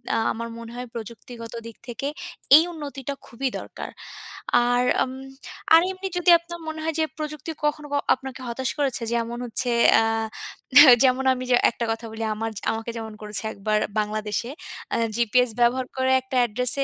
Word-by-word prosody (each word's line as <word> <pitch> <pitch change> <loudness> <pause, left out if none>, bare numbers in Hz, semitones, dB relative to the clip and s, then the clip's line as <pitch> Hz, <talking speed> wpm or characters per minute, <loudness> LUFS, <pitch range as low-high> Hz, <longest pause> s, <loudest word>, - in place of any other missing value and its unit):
আ - - +2 0.2
আমার 230 +1 -5
মনে 230 0 -9
হয় 250 +1 -5
প্রযুক্তিগত 230 +1 -9
দিক 230 -1 -10
থেকে 245 +4 -4 0.5
এই 315 - +8
উন্নতিটা 285 -4 -6
খুবই 260 +2 -3
দরকার। - - -8 0.8
আর 245 0 +3 0.2
উম 255 - -5 0.6
আর 330 - +9
এমনি 380 +1 -5
যদি 355 0 +2
আপনার 345 0 -9
মনে 315 0 -5
হয় 320 -1 -2
যে, - - +3
প্রযুক্তি 305 0 -5
কখনো 295 0 -1 0.3
আপনাকে 265 0 -9
হতাশ 245 +2 -2
করেছে 270 -4 0
যেমন 235 0 -2
হচ্ছে 245 +2 0 0.3
আ - - +2 1.0
যেমন 260 0 +3
আমি 255 0 -5
ঐ - - -8
যে, 245 - +6
একটা 235 0 -3
কথা 225 +1 -4
বলি 225 +1 -5
আমার 225 +1 -3 0.2
আমাকে 225 +1 -4
যেমন 220 -1 -6
করেছে 210 0 -4
১ - - -12
বার 215 0 +3 0.2
বাংলাদেশে 215 +2 -2 0.5
আ - - +1 0.2
জিপিএস 240 +1 +3
ব্যবহার 250 +2 +2
করে 260 0 +2
একটা 260 0 -7
অ্যাড্রেস 245 +1 +2
245 Hz, 170 wpm, -24 LUFS, 230-275 Hz, 1.0 s, আর